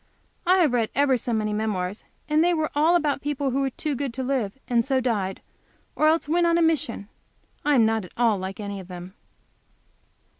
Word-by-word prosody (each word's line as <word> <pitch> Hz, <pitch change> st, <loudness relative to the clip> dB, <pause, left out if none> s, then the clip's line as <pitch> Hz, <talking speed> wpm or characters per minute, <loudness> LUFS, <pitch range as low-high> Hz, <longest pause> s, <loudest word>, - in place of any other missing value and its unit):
I 370 Hz, +1 st, +5 dB
have 300 Hz, -7 st, +3 dB
read 230 Hz, -3 st, +1 dB
ever 280 Hz, -1 st, +3 dB
so 245 Hz, 0 st, -3 dB
many 215 Hz, -2 st, 0 dB
memoirs, 210 Hz, -2 st, -2 dB, 0.2 s
and 305 Hz, +1 st, +3 dB
they 350 Hz, 0 st, +3 dB
were 315 Hz, -1 st, -1 dB
all 315 Hz, +4 st, +3 dB
about 295 Hz, -4 st, +1 dB
people 285 Hz, -2 st, -1 dB
who 265 Hz, -, 0 dB
were 270 Hz, -, +1 dB
too 300 Hz, +3 st, -4 dB
good 270 Hz, -3 st, -3 dB
to 260 Hz, -, -3 dB
live, 250 Hz, -5 st, -1 dB
and 235 Hz, -1 st, +2 dB
so 265 Hz, +1 st, +1 dB
died; 210 Hz, -7 st, -2 dB, 0.5 s
or 305 Hz, -, +3 dB
else 320 Hz, 0 st, +2 dB
went 340 Hz, +2 st, +2 dB
on 335 Hz, 0 st, +3 dB
a -, -, +2 dB
mission. 295 Hz, -10 st, 0 dB, 0.6 s
I 295 Hz, 0 st, +3 dB
am 230 Hz, -4 st, +5 dB
not 220 Hz, -2 st, 0 dB
at 180 Hz, -, -14 dB
all 230 Hz, -4 st, +2 dB
like 190 Hz, +2 st, -6 dB
any 200 Hz, -1 st, -5 dB
of 185 Hz, -, -10 dB
them. 180 Hz, 0 st, -9 dB
255 Hz, 215 wpm, -25 LUFS, 215-295 Hz, 0.6 s, I